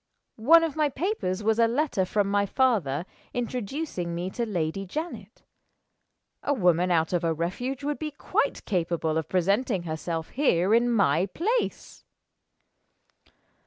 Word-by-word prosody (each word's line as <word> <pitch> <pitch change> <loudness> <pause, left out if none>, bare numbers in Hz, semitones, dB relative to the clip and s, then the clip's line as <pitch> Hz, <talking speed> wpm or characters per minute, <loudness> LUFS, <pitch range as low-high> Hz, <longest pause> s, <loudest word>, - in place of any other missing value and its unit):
One 330 +8 +7
of 320 -4 -2
my 305 -2 +2
papers 260 - -2
was 220 +1 +2
a 230 - +5
letter 245 -6 0
from 205 +2 +1
my 200 0 +1
father, 190 - +1 0.3
introducing 245 - -3
me 180 +2 -3
to 235 +2 -2
Lady 175 -1 -2
Janet. 310 - -6 1.0
A 285 - 0
woman 180 -4 +3
out 165 -1 +1
of 175 - +1
a 165 -1 +1
refuge 245 - -3
would 295 0 -2
be 310 - -3
quite 290 - -1
capable 170 -4 -1
of 160 -1 -2
presenting 195 +2 +1
herself 160 0 -4
here 205 - +2
in 235 +1 +4
my 185 -6 +3
place." 440 - -2
200 Hz, 140 wpm, -26 LUFS, 170-265 Hz, 1.0 s, One